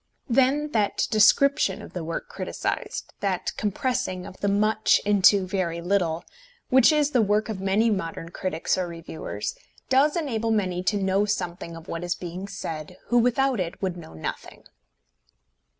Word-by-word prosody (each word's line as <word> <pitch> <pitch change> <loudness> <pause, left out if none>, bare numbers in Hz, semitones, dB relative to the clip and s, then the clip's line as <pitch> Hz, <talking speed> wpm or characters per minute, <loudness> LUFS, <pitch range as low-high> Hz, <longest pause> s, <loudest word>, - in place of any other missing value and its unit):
Then 270 +4 +2
that 210 -5 +1
description 215 -1 +4
of - - -11
the 175 - -4
work 165 - -4
criticised, 485 - -4
that 190 -3 -1
compressing 210 -3 -2
of 185 - -10
the 200 - -1
much 215 +2 +3
into 200 -1 +5
very 185 -3 -2
little, 170 -2 0 0.4
which 260 +3 +6
is 300 -1 +2
the 250 -4 +3
work 210 +1 +1
of 200 -3 -4
many 205 +4 +2
modern 165 -4 -3
critics 180 0 -1
or 180 - -1
reviewers, 165 -1 -5 0.4
does 275 +3 +4
enable 230 -8 -1
many 185 -5 0
to 205 - +2
know 195 +1 +2
something 180 -4 -3
of 165 0 -11
what 165 +1 -4
is 175 0 -1
being 180 +2 -6
said, 180 -3 -6
who 240 - +4
without 250 +1 +2
it 175 -2 -3
would 185 -3 -2
know 165 - -11
nothing. 80 - -6
200 Hz, 160 wpm, -25 LUFS, 180-230 Hz, 0.4 s, which